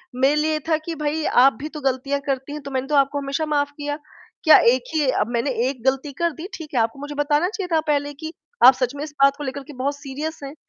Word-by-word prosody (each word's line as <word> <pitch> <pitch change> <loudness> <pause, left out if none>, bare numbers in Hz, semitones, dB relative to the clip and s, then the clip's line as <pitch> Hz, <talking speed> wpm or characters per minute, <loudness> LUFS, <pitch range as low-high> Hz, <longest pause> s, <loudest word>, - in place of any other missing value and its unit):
मेरे 270 +3 +3
लिए 310 0 +1
था 315 - +3
कि 335 -1 -4
भाई 300 +1 -2
आप 260 +1 +5
भी 300 - -4
तो 300 -1 -8
गलतियाँ 275 +1 -1
करती 270 0 -2
हैं 300 - -6
तो 280 0 -8
मैंने 265 0 -2
तो 295 - 0
आपको 275 +1 +3
हमेशा 280 +3 -2
माफ़ 290 -1 0
किया। 290 0 -3 0.5
क्या 315 - +8 0.2
एक 255 -1 -1
ही 300 -3 +2
अब - - 0
मैंने 235 +4 0 0.2
एक 255 -4 -7
ग़लती 270 +2 +1
कर 340 +4 0
दी, 325 +4 -8
ठीक 310 -3 -10
है, 250 - +2
आपको 225 +4 -2
मुझे 290 +1 -6
बताना 295 +4 +1
चाहिए 400 -4 -4
था - - +4
पहले 290 -1 0
कि 315 +3 -7 0.3
आप 260 - +10
सच 255 +1 -2
में 285 - -5
इस 300 -1 -8
बात 275 0 +5
को 295 - -6
लेकर 275 0 -5
के 295 - -12
बहुत 275 +2 -2
सीरियस 290 +3 -6
हैं, 275 +1 -6
285 Hz, 265 wpm, -22 LUFS, 270-300 Hz, 0.5 s, आप